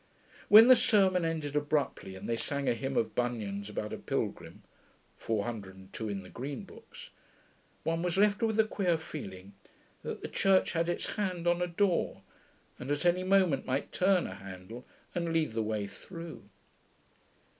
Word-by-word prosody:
When 220 +3 +10
the 255 - +10
sermon 190 -6 +3
ended 155 -3 -2
abruptly, 145 -9 -1
and 95 - -8
they 115 - 0
sang 140 +4 -2
a 125 - +4
hymn 135 +3 -3
of 110 - +1
Bunyan's 105 -5 -2
about 105 0 -4
a - - -5
pilgrim - - -4 0.5
(402 105 -2 -4
in 100 -1 -4
the 90 - -12
green 135 +2 -5
books), - - -13 0.7
one 165 +1 0
was 180 0 -1
left 205 0 +3
with 220 -1 +1
a - - +8
queer 190 -5 0
feeling 100 -12 -8 0.5
that - - -6
the - - -2
Church 195 -1 +3
had 165 0 0
its 175 - -1
hand 185 -4 -2
on 175 0 +2
a 180 - +1
door, 180 +1 0 0.6
and 125 - -6
at 145 +4 -1
any 175 +1 +3
moment 185 -7 +2
might 135 +2 -1
turn 185 -1 +3
a - - -5
handle 95 +5 -10 0.3
and 170 -1 -1
lead 160 -5 +1
the 115 - 0
way 105 -1 -1
through.... 165 - -10
150 Hz, 165 wpm, -31 LUFS, 110-180 Hz, 0.7 s, When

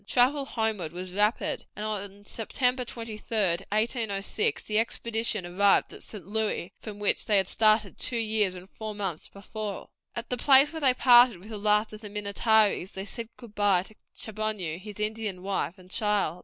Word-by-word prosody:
Travel 270 +3 +3
homeward 220 - -2
was 180 +1 -6
rapid, 210 +3 0
and 210 - -4
on 205 -1 -5
September 250 +4 -1
23, 225 -2 -5
1806, 215 - 0
the 215 0 +1
expedition 225 -3 -1
arrived 195 +3 +3
at - - -11
St. 205 -7 -8
Louis, 210 -3 -2
from 210 -2 -8
which 205 -1 +1
they 210 -2 +4
had 190 -1 +2
started 215 -2 +2
two 245 - 0
years 215 -4 +2
and 180 +1 -10
four 215 +1 -7
months 190 -6 -4
before. 205 0 -7 0.3
At 235 +1 -6
the 250 - +1
place 275 +4 +6
where 320 - -5
they 260 -3 +4
parted 245 -4 +7
with 190 +5 -13
the 215 - -5
last 210 +1 +2
of 215 - -9
the 210 - -8
Minnetarees 210 -1 +2
they 190 0 -5
said 230 +2 -7
goodbye 205 -5 +1
to 215 +2 -15 0.2
Chaboneau, 215 -6 -3
his 210 +1 -10
Indian 210 -3 -2
wife, 190 -3 -2
and 185 0 -17
child. 205 -5 +1
210 Hz, 175 wpm, -27 LUFS, 195-225 Hz, 0.3 s, parted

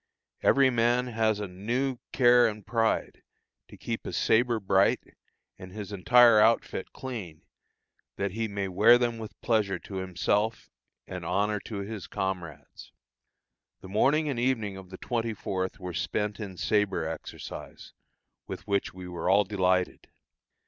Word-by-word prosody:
Every 135 -1 +4
man 120 +1 +2
has 110 -2 +1
now 105 - -3
a - - -7
new 120 +8 -2
care 120 -1 +5
and 105 -2 -6
pride 115 -2 0 0.5
to - - -14
keep - - -5
his - - -3
sabre 120 0 +2
bright, 95 -1 +3 0.6
and 90 0 -10
his 105 0 -7
entire 115 +3 +6
outfit 110 -3 +2
clean, 105 -12 -7 0.7
that 100 -1 -2
he 110 +3 -2
may 100 -1 -3
wear 105 +6 +6
them 120 -2 -1
with 110 -1 -9
pleasure 105 -5 +1
to 95 +2 -8
himself 100 +4 -1 0.3
and - - -7
honor 105 +1 0
to 105 -3 -5
his 105 -1 -6
comrades. 90 -6 -5 0.9
The 95 - -11
morning 145 +10 +2
and 135 -5 -2
evening 115 -6 0
of 95 -1 -11
the 95 - -9
24th 110 -6 -3
were 90 -2 -6
spent 105 +5 -2
in 100 -4 -7
sabre 100 -6 0
exercise, 80 -1 -8 0.5
with - - -7
which 100 -2 -1
we 90 -1 -8
were 90 0 -3
all 100 +2 +5
delighted. 95 -2 0
105 Hz, 150 wpm, -28 LUFS, 95-115 Hz, 0.9 s, entire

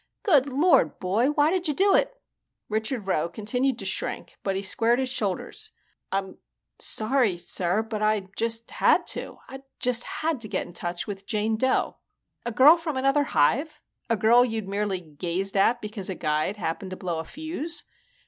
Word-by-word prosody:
Good 290 - +4
Lord, 290 +7 +3
boy, 200 +7 +1
why 295 +1 +3
did 365 -2 0
you 300 - 0
do 390 +4 +4
it?" - - +1 0.5
Richard 220 +1 -2
Rowe 170 -3 0
continued 250 +6 0
to 195 - -6
shrink 190 - -3
but 195 -1 -1
he 195 - -2
squared 230 +4 +2
his 260 -1 -1
shoulders. 250 - -2 0.4
"I'm 190 -1 -3 0.4
sorry, 220 -4 +1
sir, 180 +3 0
but 220 -1 -5
I 215 -1 +2
just 230 0 -2
had - - +3
to. - - -7
I 270 0 -9 0.2
just 245 -1 +2
had 315 -3 -2
to 225 - -2
get - - -2
in - - -12
touch 175 0 -3
with 195 -1 -7
Jane 220 0 0
Dough." 260 +4 +1 0.5
"A - - -1
girl 280 +9 +7
from 325 -5 -4
another 275 +2 +2
hive? 280 - +1 0.3
A 230 - +2
girl 235 +3 +5
you'd 225 -4 -3
merely 200 -2 -1
gazed 175 +5 -4
at 225 +5 +3
because 210 -3 -6
a 190 - -3
guide 155 +6 -1
happened 185 +1 -3
to 185 - -6
blow 175 -3 -3
a - - -3
fuse?" 315 - -4
220 Hz, 180 wpm, -26 LUFS, 195-270 Hz, 0.5 s, girl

